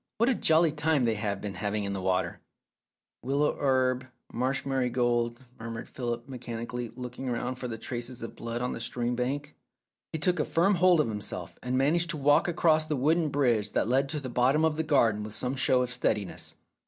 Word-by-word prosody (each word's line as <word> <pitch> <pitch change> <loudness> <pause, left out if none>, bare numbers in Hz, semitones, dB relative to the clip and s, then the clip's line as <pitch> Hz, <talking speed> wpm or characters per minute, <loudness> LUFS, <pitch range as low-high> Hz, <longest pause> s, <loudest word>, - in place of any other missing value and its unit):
"What 235 +3 +3
a - - +4
jolly 160 -6 +4
time 150 -3 +1
they 115 - +2
have 105 -2 -2
been 100 -2 -4
having 105 +3 -2
in 100 0 -2
the 95 - -3
water! 95 -1 0 0.3
" - - -64
" - - -64
Willow 140 +3 +1
herb, 130 -1 +1 0.3
marsh 130 +3 -1
marigold," 120 -2 0 0.2
murmured 115 0 -6
Philip 120 -2 -4
mechanically, 120 -2 -5
looking 125 +1 -5
round 125 +1 -2
for 125 - -4
the 115 -2 -5
traces 120 +1 -6
of 115 - -7
blood 115 +1 -4
on 125 - -1
the - - -6
stream 120 +1 -2
bank.... 140 +4 -3 0.6
He - - -2
took 175 +3 +1
a - - +3
firm 175 +7 +2
hold 180 -2 +5
of 150 - -1
himself, 105 -2 -5
and 125 +1 -1
managed 165 +6 +2
to 165 - -2
walk 145 +3 +4
across 160 -2 +3
the 155 -1 -2
wooden 155 +4 +2
bridge 120 -7 +1
that - - +1
led 135 +3 +2
to 150 +1 -2
the 135 - -6
bottom 130 +6 +3
of 160 -1 +1
the 160 - 0
garden 120 -9 +3
with 105 0 -6
some 125 +3 -1
show 130 -1 +3
of 125 0 -3
steadiness. 105 -6 -2
125 Hz, 210 wpm, -28 LUFS, 115-150 Hz, 0.6 s, hold